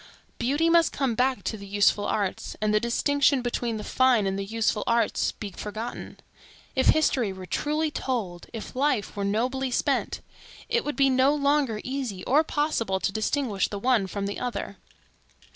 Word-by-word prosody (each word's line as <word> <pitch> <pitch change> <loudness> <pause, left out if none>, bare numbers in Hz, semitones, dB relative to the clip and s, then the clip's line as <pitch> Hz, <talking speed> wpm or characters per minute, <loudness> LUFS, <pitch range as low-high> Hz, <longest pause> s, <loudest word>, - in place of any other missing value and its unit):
Beauty 285 +7 +1
must 335 -1 +4
come 270 -4 0
back 255 +3 +1
to 220 - -3
the 200 -1 -10
useful 205 +1 +2
arts, 200 -3 -2
and 215 0 +1
the 215 - +4
distinction 275 +3 +2
between 240 -2 -2
the 210 - -6
fine 255 -4 +3
and 195 0 0
the - - -2
useful 220 +1 0
arts 235 0 +1
be 210 -3 -7
forgotten. 215 +6 -6 0.6
If 260 - +2
history 265 -8 +3
were 190 -1 -8
truly 300 - -1
told, 210 - -3
if 225 +1 -8
life 260 -7 0
were 200 - -2
nobly 250 +6 0
spent, 245 - 0 0.5
it 470 0 +1
would 295 - -3
be 275 0 +4
no 260 +3 +4
longer 280 -6 +1
easy 255 -8 -4
or 295 +5 +3
possible 290 -12 -1
to 195 - -1
distinguish 220 -1 0
the 205 - -5
one 225 -2 +2
from 200 +1 -4
the 200 - -4
other. 245 -1 -4
240 Hz, 175 wpm, -26 LUFS, 205-275 Hz, 0.6 s, must